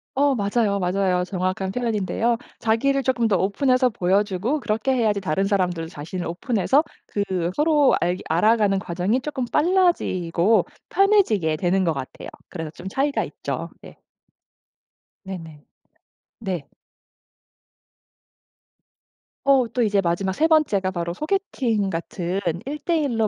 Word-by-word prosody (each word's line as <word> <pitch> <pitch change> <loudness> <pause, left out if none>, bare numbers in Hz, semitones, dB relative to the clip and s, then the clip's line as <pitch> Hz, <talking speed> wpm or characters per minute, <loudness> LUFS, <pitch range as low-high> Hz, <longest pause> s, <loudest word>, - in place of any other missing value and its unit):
어 280 -1 +3
맞아요, 205 -1 +1
맞아요. 180 0 +1
정확한 185 +1 -2
표현인데요. 230 0 0 0.2
자기를 270 +5 +1
쪼끔 240 -4 +1
더 195 - +3
오픈해서 255 +7 +2
보여주고 205 +7 0
그렇게 230 +3 -1
해야지 215 -5 +1
다른 190 +5 0
사람들도 180 -5 0
자신을 165 +4 -6
오픈해서 235 - +1 0.2
그 205 - -1 0.3
서로 295 -2 +4
알게 175 +1 0
알아가는 205 +4 +3
과정이 190 +7 -1
조금 265 -4 -3
빨라지고 230 - +2 0.2
편해지게 360 - +3
되는 185 +2 +1
것 165 - +2
같아요. 135 -2 -7 0.2
그래서 160 -4 -5
좀 190 +3 -8
차이가 280 +6 0
있죠. - - -5 0.2
예. - - -12 1.3
네네. 165 -6 -8 0.8
네. 185 -9 -4 2.8
어 270 -3 +4
또 245 - 0
이제 205 -3 +2
마지막 185 +2 -1
3 315 +10 +2
번째가 215 - +2
바로 170 -2 -3
소개팅 255 - -1
같은 175 +2 -3 0.3
1 295 +2 -4
대 340 0 0
1 240 -6 -1
로 215 - +3
205 Hz, 280 characters per minute, -23 LUFS, 180-260 Hz, 2.8 s, 서로